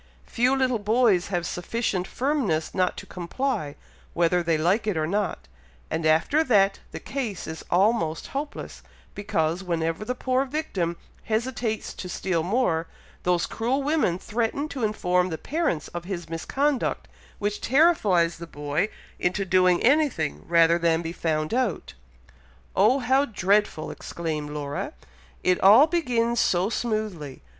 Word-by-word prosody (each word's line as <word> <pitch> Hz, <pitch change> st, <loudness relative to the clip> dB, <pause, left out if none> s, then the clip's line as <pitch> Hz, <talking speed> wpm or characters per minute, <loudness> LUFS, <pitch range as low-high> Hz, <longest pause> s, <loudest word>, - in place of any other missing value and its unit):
Few 250 Hz, +3 st, +2 dB
little 255 Hz, -3 st, +1 dB
boys 210 Hz, -3 st, +3 dB
have 175 Hz, -3 st, -2 dB
sufficient 185 Hz, 0 st, -2 dB
firmness 245 Hz, -, -1 dB
not 185 Hz, -1 st, 0 dB
to -, -, -7 dB
comply, 180 Hz, -, -3 dB, 0.4 s
whether 175 Hz, +1 st, +2 dB
they 170 Hz, -2 st, +1 dB
like 185 Hz, +8 st, +1 dB
it 200 Hz, -6 st, 0 dB
or 155 Hz, -, +1 dB
not, 200 Hz, +4 st, -2 dB, 0.4 s
and 160 Hz, 0 st, 0 dB
after 165 Hz, -, +3 dB
that 200 Hz, -8 st, +3 dB
the -, -, -6 dB
case 240 Hz, -9 st, -4 dB
is 160 Hz, 0 st, -7 dB
almost 185 Hz, -4 st, +1 dB
hopeless, 285 Hz, +2 st, -6 dB, 0.3 s
because, 170 Hz, -4 st, -1 dB
whenever 165 Hz, 0 st, -1 dB
the 250 Hz, +4 st, -3 dB
poor 255 Hz, +1 st, +1 dB
victim 200 Hz, -, -2 dB, 0.3 s
hesitates 225 Hz, 0 st, -2 dB
to 180 Hz, -, -7 dB
steal 175 Hz, -2 st, -1 dB
more, 170 Hz, -4 st, 0 dB, 0.3 s
those 180 Hz, -1 st, +1 dB
cruel 255 Hz, +5 st, -1 dB
women 290 Hz, -, +1 dB
threaten 230 Hz, +8 st, -2 dB
to 265 Hz, -6 st, -5 dB
inform 180 Hz, -4 st, +1 dB
the 160 Hz, -, -3 dB
parents 275 Hz, -, -1 dB
of 175 Hz, 0 st, -6 dB
his 180 Hz, -3 st, -5 dB
misconduct, 270 Hz, -, -1 dB, 0.3 s
which 205 Hz, 0 st, -2 dB
terrifies 215 Hz, -, +3 dB
the 170 Hz, -, -7 dB
boy 150 Hz, +6 st, -2 dB, 0.3 s
into 190 Hz, +3 st, 0 dB
doing 185 Hz, -1 st, +3 dB
anything 270 Hz, -, +2 dB
rather 170 Hz, 0 st, +4 dB
than 170 Hz, 0 st, +2 dB
be 165 Hz, 0 st, -4 dB
found 155 Hz, -1 st, -1 dB
out." 240 Hz, -, -1 dB, 0.8 s
"Oh, 215 Hz, +7 st, +5 dB
how 265 Hz, +1 st, +2 dB
dreadful!" 200 Hz, -, +1 dB
exclaimed 155 Hz, -3 st, -4 dB
Laura. 145 Hz, -1 st, -4 dB, 0.5 s
"It 180 Hz, -1 st, +2 dB
all 215 Hz, +9 st, +8 dB
begins 245 Hz, -8 st, 0 dB
so 185 Hz, +2 st, +2 dB
smoothly! 215 Hz, -, -3 dB
195 Hz, 140 wpm, -25 LUFS, 170-245 Hz, 0.8 s, all